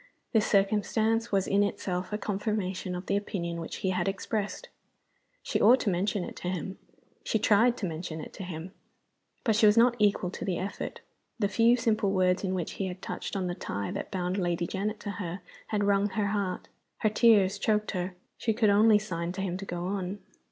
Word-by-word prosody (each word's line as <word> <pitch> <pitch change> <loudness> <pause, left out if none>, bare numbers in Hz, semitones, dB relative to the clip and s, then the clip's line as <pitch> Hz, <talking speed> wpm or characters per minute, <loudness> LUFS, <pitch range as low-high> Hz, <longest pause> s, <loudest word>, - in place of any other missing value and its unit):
This 220 -2 +3
circumstance 215 +3 +2
was 195 -2 +2
in 200 +1 +2
itself 185 -2 -2
a 210 - -1
confirmation 195 -3 -2
of 180 +1 -6
the 200 - 0
opinion 170 -5 -3
which 165 - -6
he 190 - +2
had 180 -1 0
expressed. 205 - -3 0.8
She - - -1
ought 245 +5 +7
to 200 - +1
mention 190 +2 0
it - - -7
to - - -5
him; 185 +1 -4 0.4
she - - +1
tried 225 +3 +4
to 200 - -3
mention 160 -1 -4
it 155 - -8
to 195 - -7
him. 175 0 -6 0.7
But 220 -3 +2
she 215 0 +6
was 210 +2 +5
not 240 +1 +6
equal 200 -3 +2
to - - -6
the 190 -6 -1
effort. 195 +2 -5 0.4
The 210 -3 +1
few 230 +4 +4
simple 220 -4 +1
words 185 0 +2
in 190 -1 0
which 175 -3 -2
he 195 - -3
had 185 +1 -7
touched - - -5
on 190 -2 -1
the 175 - -1
tie 100 - -4
that - - -4
bound 185 0 -1
Lady 175 -1 0
Janet 205 +4 -3
to 205 - -4
her 180 +1 -4 0.3
had 210 -1 0
wrung 200 0 +3
her 205 0 -1
heart. 195 -3 -2 0.3
Her 215 - +4
tears 210 -3 +4
choked 215 0 +1
her. 180 -1 -3 0.2
She 225 - +1
could 215 -2 +3
only 210 +1 +6
sign 175 -4 -3
to 190 - -4
him 185 -2 -2
to 195 - -6
go 175 -2 -4
on. 190 0 -2
195 Hz, 210 wpm, -29 LUFS, 180-210 Hz, 0.8 s, ought